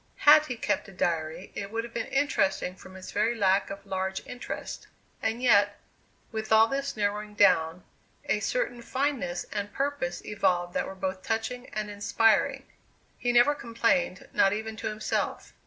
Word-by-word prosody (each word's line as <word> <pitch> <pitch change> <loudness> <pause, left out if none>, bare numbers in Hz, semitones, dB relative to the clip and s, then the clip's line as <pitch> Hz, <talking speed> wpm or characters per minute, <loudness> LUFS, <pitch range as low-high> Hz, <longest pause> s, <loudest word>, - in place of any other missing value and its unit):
Had 305 +1 +7
he 250 - -3
kept - - -1
a - - -11
diary 170 -1 -2
it 200 - -5
would 225 +2 -2
have 235 0 -9
been - - -3
interesting 195 -10 +1
from 185 0 -13
its 185 0 -9
very 220 +3 +1
lack 195 -2 +2
of 195 0 -8
large 190 0 -3
interest. 250 0 -6 0.3
And 225 +3 -1
yet, 205 -4 +4 0.5
with 220 -1 -4
all 220 0 +7
this 275 +1 -3
narrowing 210 0 -2
down, 170 -3 +3 0.4
a - - +1
certain - - -1
fineness 255 -9 -2
and 205 -1 -3
purpose 275 -11 -2
evolved 175 -4 0
that - - -1
were 190 - -7
both 190 0 -3
touching 225 +4 -3
and 215 0 -3
inspiring. 210 +2 +2 0.5
He 245 - +1
never 240 +4 +5
complained, 235 -3 0
not 195 0 +4
even 220 +1 -4
to 205 - -3
himself. 215 0 -2
215 Hz, 165 wpm, -28 LUFS, 190-240 Hz, 0.5 s, Had